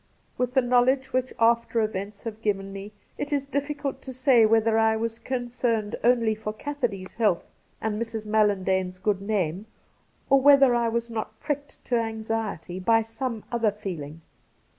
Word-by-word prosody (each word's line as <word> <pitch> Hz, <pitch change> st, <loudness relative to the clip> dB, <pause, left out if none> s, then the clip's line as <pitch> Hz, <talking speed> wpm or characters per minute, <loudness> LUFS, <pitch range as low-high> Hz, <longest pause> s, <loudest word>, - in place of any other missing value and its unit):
With 250 Hz, +1 st, -2 dB
the 265 Hz, -, +5 dB
knowledge 255 Hz, +2 st, +2 dB
which 255 Hz, 0 st, 0 dB
after 235 Hz, 0 st, +3 dB
events 205 Hz, -1 st, -3 dB
have 225 Hz, -1 st, -6 dB
given 195 Hz, -2 st, -1 dB
me 195 Hz, +1 st, -7 dB, 0.3 s
it 290 Hz, -, -3 dB
is 280 Hz, -1 st, 0 dB
difficult 285 Hz, 0 st, -3 dB
to 265 Hz, -, -8 dB
say 255 Hz, -3 st, +5 dB
whether 225 Hz, 0 st, +3 dB
I 220 Hz, 0 st, +3 dB
was 225 Hz, +1 st, -3 dB
con 245 Hz, -2 st, -3 dB
cerned 230 Hz, -4 st, -1 dB
only 235 Hz, -2 st, +3 dB
for 215 Hz, 0 st, -5 dB
Cassidy 240 Hz, -7 st, -3 dB
's -, -, -13 dB
health 210 Hz, -7 st, +1 dB, 0.3 s
and 215 Hz, 0 st, -2 dB
Mrs. 225 Hz, -2 st, -4 dB
Mallan 210 Hz, -2 st, +2 dB
dane's 185 Hz, -1 st, 0 dB
good 195 Hz, +1 st, 0 dB
name, 200 Hz, -1 st, -1 dB, 0.6 s
or 275 Hz, -1 st, +5 dB
whether 275 Hz, -2 st, +7 dB
I 235 Hz, -1 st, +2 dB
was 235 Hz, +1 st, -2 dB
not 220 Hz, -1 st, -5 dB
pricked 290 Hz, -1 st, -5 dB
to 245 Hz, -, +1 dB
anxiety 220 Hz, -5 st, -3 dB
by 225 Hz, +4 st, +3 dB
some 225 Hz, 0 st, -4 dB
other 235 Hz, -2 st, +2 dB
feeling. 170 Hz, -7 st, -6 dB
225 Hz, 170 wpm, -26 LUFS, 210-245 Hz, 0.6 s, whether